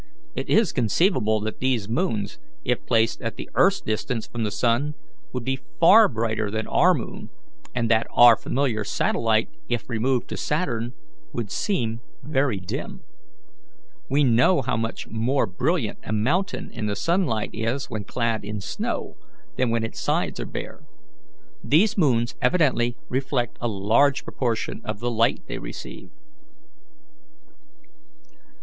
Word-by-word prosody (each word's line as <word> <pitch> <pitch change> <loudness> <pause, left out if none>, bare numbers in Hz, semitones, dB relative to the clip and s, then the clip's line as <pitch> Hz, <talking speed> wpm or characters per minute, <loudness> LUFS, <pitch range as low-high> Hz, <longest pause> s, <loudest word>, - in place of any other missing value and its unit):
It - - -5
is 220 -4 +4
conceivable 120 - +2
that 110 0 -4
these 125 -6 0
moons, 110 - -1 0.3
if - - 0
placed 115 0 +2
at 115 -1 -3
the - - -7
earth's 195 +2 +4
distance 110 +2 -2
from 120 -1 -4
the 105 - 0
sun, 120 +8 0 0.4
would 125 -2 -4
be 135 0 -1 0.2
far 210 +6 +8
brighter 110 - -1
than 110 +1 -2
our - - +4
moon, - - -6 0.5
and 115 -2 +1
that 110 0 +3
our 120 -1 +8
familiar 125 -5 -1
satellite, - - +1 0.2
if 120 -2 -2
removed 125 +1 0
to - - -4
Saturn, 125 -7 -1 0.4
would 110 -4 -4
seem 120 - -1 0.2
very 135 -7 0
dim. 90 - -6 1.1
We 145 +2 +3
know 130 +5 +4
how 125 - 0
much 115 0 -3
more 120 +4 +1
brilliant 125 - -1
a - - -6
mountain 145 - 0
in 110 -3 -4
the 100 - -1
sunlight 165 - 0
is 115 +5 -2
when 110 -2 -3
clad 115 -2 -1
in 105 +1 -4
snow 100 - -4 0.4
than 125 - +1
when 115 0 +1
its 115 - -5
sides - - 0
are - - -3
bare. - - -7 0.8
These 175 +9 +3
moons 125 - +2
evidently 130 -9 +2
reflect 130 -1 -1
a 120 - 0
large 115 +7 +2
proportion 120 -3 -2
of 105 -1 -4
the 120 +1 -1
light 115 0 +2
they - - -5
receive." - - -8
120 Hz, 145 wpm, -24 LUFS, 110-140 Hz, 1.1 s, far